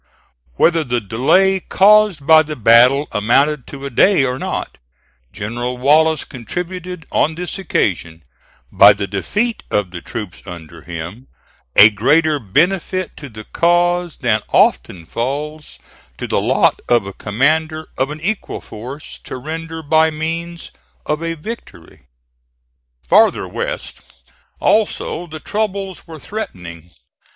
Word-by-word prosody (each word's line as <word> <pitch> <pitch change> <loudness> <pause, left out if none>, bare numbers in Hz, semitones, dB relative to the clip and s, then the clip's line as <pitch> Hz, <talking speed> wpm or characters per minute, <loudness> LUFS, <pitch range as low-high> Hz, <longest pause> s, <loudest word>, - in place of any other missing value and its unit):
Whether 165 - +3
the 125 -3 -1
delay 135 - +2
caused 200 -5 +3
by 160 +1 +7
the 155 0 -5
battle 125 +5 +5
amounted 130 +6 +1
to 140 -1 -8
a 140 - -5
day 165 - +4
or 125 0 -2
not, - - -5 0.5
General 120 +4 -4
Wallace 155 +4 +3
contributed 180 +6 -6
on 160 +2 +1
this 180 +3 -5
occasion, 85 - -2 0.5
by 100 +1 +7
the 100 0 -4
defeat 205 - -2
of 100 -4 -1
the 85 -2 -7
troops 105 -6 -7
under 85 -3 -10
him 85 +10 -8 0.5
a 105 +1 +8
greater 150 +8 +2
benefit 175 - 0
to 145 - -9
the 110 -1 -10
cause 175 +3 +1
than 110 -3 +1
often 85 -3 +2
falls 145 - -4 0.4
to - - -5
the - - 0
lot - - +2
of 120 -4 +3
a 100 - -7
commander 155 - -1
of 130 +2 -1
an 150 +1 -7
equal 210 +5 -3
force 125 +7 -9
to - - -6
render 160 +4 -6
by 160 +2 +3
means 165 +2 -5 0.3
of 150 +1 -2
a 165 0 -3
victory. 150 - -10 1.0
Farther - - +3
west - - -5 0.6
also 205 -4 0
the 155 -1 -8
troubles 200 -1 -4
were 160 -1 -9
threatening. 90 - -8
150 Hz, 130 wpm, -18 LUFS, 110-170 Hz, 1.0 s, a